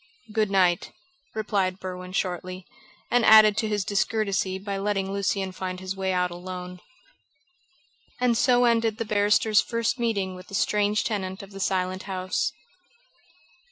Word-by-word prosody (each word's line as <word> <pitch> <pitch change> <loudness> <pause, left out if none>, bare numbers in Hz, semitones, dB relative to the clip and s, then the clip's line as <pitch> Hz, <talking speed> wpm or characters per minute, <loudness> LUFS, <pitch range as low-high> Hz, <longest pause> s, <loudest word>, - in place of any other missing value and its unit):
"Good 215 -2 +1
night," 180 -3 +2 0.4
replied 195 -3 -1
Berwin 180 0 -7
shortly, 185 0 -3 0.5
and 245 0 +3
added 215 -1 +8
to 220 0 0
his 205 -2 -1
discourtesy 200 -2 0
by 195 0 -4
letting 195 -1 -1
Lucian 195 -1 -1
find 185 0 -5
his 185 +1 -5
way 190 0 -1
out 180 -1 0
alone. 180 0 -7 1.4
And 245 -1 +2
so 245 +1 +4
ended 230 -2 +2
the 230 - -3
barrister's 210 0 +3
first 230 +2 -1
meeting 200 -5 -1
with 185 0 -11
the 195 - -7
strange 210 +1 +1
tenant 190 -3 -3
of 195 - -12
the 195 - -9
Silent 185 -1 -1
House. 185 -1 -1
195 Hz, 145 wpm, -25 LUFS, 185-215 Hz, 1.4 s, added